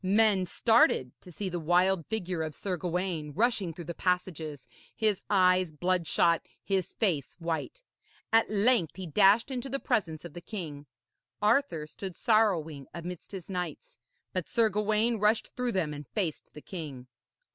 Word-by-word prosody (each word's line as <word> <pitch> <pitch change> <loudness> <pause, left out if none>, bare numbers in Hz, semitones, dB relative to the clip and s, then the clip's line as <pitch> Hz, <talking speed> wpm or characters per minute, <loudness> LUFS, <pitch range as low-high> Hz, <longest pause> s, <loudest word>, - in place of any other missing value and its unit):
Men 200 -1 +3
started 220 - +3
to 180 - -12
see 190 +5 -4
the 175 -1 -3
wild 175 +1 +2
figure 185 -6 -2
of 155 -1 -4
Sir 190 -2 -2
Gawaine 175 -3 -2
rushing 215 - +1
through 170 +1 -9
the 170 - -4
passages, 165 -6 -2 0.3
his 215 -4 +1
eyes 185 -3 +4
bloodshot, 170 0 +1 0.2
his 190 -3 -1
face 170 - 0
white. 170 - -4 0.5
At 225 0 +5
length 210 -4 +3
he 190 - -6
dashed 200 - +4
into 260 +1 -4
the 275 - -1
presence 175 - -1
of 170 - -8
the 175 - -8
king. 155 -9 -6 0.5
Arthur 210 - +2
stood 185 +3 -7
sorrowing 175 - +2
amidst 175 0 -7
his 190 -4 -7
knights, 195 - -5 0.4
but - - -3
Sir 230 -2 +3
Gawaine 215 +3 +1
rushed 210 +2 +2
through 250 -2 -1
them 165 -6 0
and 145 -2 -8
faced 175 - -3
the 150 - -10
king. 150 -9 -7
185 Hz, 155 wpm, -29 LUFS, 165-215 Hz, 0.5 s, At